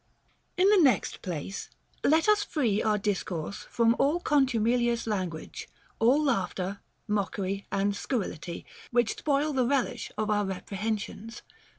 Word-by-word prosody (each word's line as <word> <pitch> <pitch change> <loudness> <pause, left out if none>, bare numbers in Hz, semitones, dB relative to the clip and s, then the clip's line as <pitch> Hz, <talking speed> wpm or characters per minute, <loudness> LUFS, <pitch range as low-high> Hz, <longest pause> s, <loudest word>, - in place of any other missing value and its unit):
In 370 +2 +5
the 415 - +6
next 270 -6 +2
place, 180 +2 -5 0.3
let 315 +5 +4
us 420 -1 +4
free 230 - 0
our 215 -1 +2
discourse 195 -4 -3
from 230 -1 +3
all 300 +5 +3
contumelious 240 -5 +2
language, 185 -7 -4 0.3
all 255 +7 +4
laughter, 195 -6 -1 0.3
mockery, 195 -1 -2
and 200 +1 +1
scur 215 0 -1
rility, 170 +2 -7 0.2
which 240 -2 +1
spoil 295 +1 +1
the 255 -3 +2
relish 250 -3 -1
of 215 0 0
our 205 0 +2
reprehensions. 205 +3 -4
220 Hz, 130 wpm, -28 LUFS, 195-265 Hz, 0.3 s, the